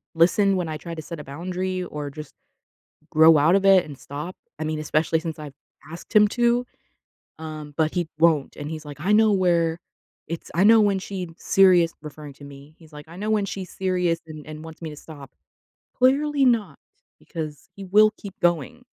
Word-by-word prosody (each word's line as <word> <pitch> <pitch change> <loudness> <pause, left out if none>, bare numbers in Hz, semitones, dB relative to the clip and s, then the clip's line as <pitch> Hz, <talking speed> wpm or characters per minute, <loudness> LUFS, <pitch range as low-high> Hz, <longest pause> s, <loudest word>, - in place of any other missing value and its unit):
listen 195 +4 +3
when 180 -3 -2
I 155 - -4
try 165 +3 -8
to 160 - -6
set 160 +1 -8
a - - -7
boundary 185 +5 -4
or 150 -4 -6
just 150 +2 -10 0.8
grow 160 0 +6
out 155 +5 +4
of 195 - +2
it 190 -2 +6
and 145 -3 -10
stop. 150 +8 -7 0.2
I - - -2
mean 155 0 -3
especially 155 +1 0
since 160 -1 -6
I've 150 -2 -8 0.4
asked 170 +5 -11
him 210 0 +7
to, 240 +2 +1 0.7
um, 155 -2 -8
but 155 -1 +1
he 175 -3 -1
won't 160 -4 +2
and 145 +1 -6
he's, 155 -1 -7
like, 145 -1 -9
"I 190 +7 +1
know 215 0 +5
where 170 -3 +1 0.5
it's 165 0 -6
I 180 +4 +3
know 225 +1 +7
when 200 -2 +2
she's 185 -2 -6
serious" 180 -4 +4
referring 150 -1 -9
to 145 - -14
me- 140 +2 -13
he's, 160 -2 -19
like, 150 0 -11
"I 170 - -12
know 210 +3 -3
when 215 -2 +2
she's 185 -2 -6
serious 180 -3 0
and 155 -2 -10
and 155 0 -9
wants 160 -1 -11
me 160 - -4
to 150 - -10
stop." 145 -4 -12 0.6
Clearly 280 +2 +2
not 210 - +1 0.4
because 155 -3 -7
he 195 - -8
will 215 +3 +5
keep 195 -2 -10
going 175 - 0
165 Hz, 200 wpm, -23 LUFS, 155-195 Hz, 0.8 s, him